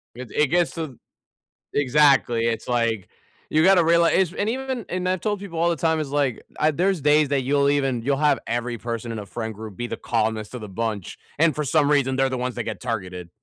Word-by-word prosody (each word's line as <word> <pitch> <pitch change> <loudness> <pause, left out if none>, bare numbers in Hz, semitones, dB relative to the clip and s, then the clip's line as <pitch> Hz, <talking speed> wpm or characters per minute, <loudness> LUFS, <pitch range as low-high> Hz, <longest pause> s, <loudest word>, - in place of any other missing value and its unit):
It 125 -3 -9
it 150 - +2
gets 175 +2 +2
to 155 -7 -6 0.8
exactly, 135 -4 +3
it's 115 -1 -2
like, 115 -5 0 0.4
you 155 +1 +3
gotta 190 -2 +6
realize 170 +1 +4
is 185 -3 +2
and 205 +3 -1
even 260 -2 -3
and 180 0 -2
I've 185 -2 0
told 205 -2 -1
people 180 -5 -6
all 170 - +3
the 170 - +1
time 160 +2 +1
is, 150 -3 -3
like, 140 -5 -1 0.3
there's 180 +2 +1
days 150 0 +4
that 140 -2 +1
you'll 140 +1 +2
even 135 -4 +1
you'll 135 +4 0
have 150 0 +3
every 120 0 -2
person 115 0 -5
in 110 - -4
a 105 - -7
friend 110 +3 -5
group 110 -2 -9
be 120 - -3
the - - -5
calmest 110 -1 -2
of 125 - -6
the 105 - -8
bunch, 105 -1 -4 0.2
and 160 -3 +4
for 150 - -1
some 145 0 +2
reason, 135 -3 +2
they're 135 0 +2
the 130 - -2
ones 125 0 -3
that 120 - -3
get - - -5
targeted. 90 -7 -4
135 Hz, 230 wpm, -23 LUFS, 115-160 Hz, 0.8 s, gotta